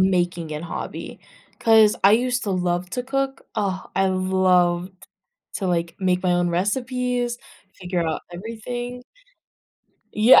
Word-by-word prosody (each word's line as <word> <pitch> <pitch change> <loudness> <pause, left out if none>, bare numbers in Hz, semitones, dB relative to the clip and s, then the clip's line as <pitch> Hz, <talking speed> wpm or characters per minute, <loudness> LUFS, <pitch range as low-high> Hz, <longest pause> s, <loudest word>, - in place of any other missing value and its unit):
making-it 175 -4 0
hobby. 170 - -6 0.4
'Cause 220 -2 +6
I 200 +2 +7
used 250 +2 +2
to 205 - -2
love 180 -1 0
to 250 - -2
cook. 270 +1 -2
Ah, 195 -3 -2
I 190 +1 +3
loved 185 -1 +1 0.5
to, 195 - -2
like, 170 -1 0
make 185 -1 +1
my 180 - +2
own 175 0 +2
recipes, 245 +6 -1 0.4
figure 180 -1 -1
out 160 - -2
everything. 240 +5 -6 1.1
Yeah, 220 +4 +8
190 Hz, 125 wpm, -23 LUFS, 180-240 Hz, 1.1 s, Yeah